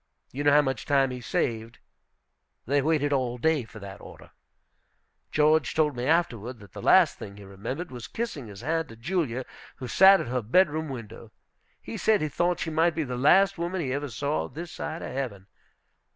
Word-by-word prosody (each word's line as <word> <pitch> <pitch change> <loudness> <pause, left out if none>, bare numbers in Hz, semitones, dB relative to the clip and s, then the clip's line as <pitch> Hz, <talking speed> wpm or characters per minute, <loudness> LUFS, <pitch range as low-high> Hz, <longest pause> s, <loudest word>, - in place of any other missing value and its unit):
You 140 +3 -4
know 145 - +5
how 150 +1 +6
much 135 -4 -3
time 135 -2 +3
he 125 -1 -6
saved, 115 0 -2 0.9
they 140 +3 +2
waited 145 -1 +1
all 125 -3 0
day 150 0 +1
for 110 - -13
that 100 -1 -9
order. - - -13 1.0
George 155 +1 +3
told 150 -3 +2
me 120 +1 -3
afterward 130 -8 0
that 100 -2 -14
the - - -8
last - - +5
thing 100 0 -9
he 105 - -11
remembered 115 - -6
was 120 -3 -8
kissing 210 - -5
his 100 -1 -10
hand 165 +5 -1
to 115 - -11
Julia, 130 -1 -2 0.3
who 130 - -7
sat 190 +8 +7
at - - -4
her 125 +1 -1
bedroom 155 - +2
window. 115 -3 -9 0.5
He - - -7
said 220 -2 +3
he 155 - -1
thought 175 +3 0
she 160 - -2
might 165 +1 +2
be 160 - 0
the 125 -3 -4
last 190 +9 +4
woman 175 +2 -2
he 135 -6 -2
ever 145 +1 -3
saw 140 +7 -2
this 170 +2 -8
side 160 +2 -5
of - - -6
heaven. 115 -8 -4
140 Hz, 195 wpm, -27 LUFS, 120-160 Hz, 1.0 s, sat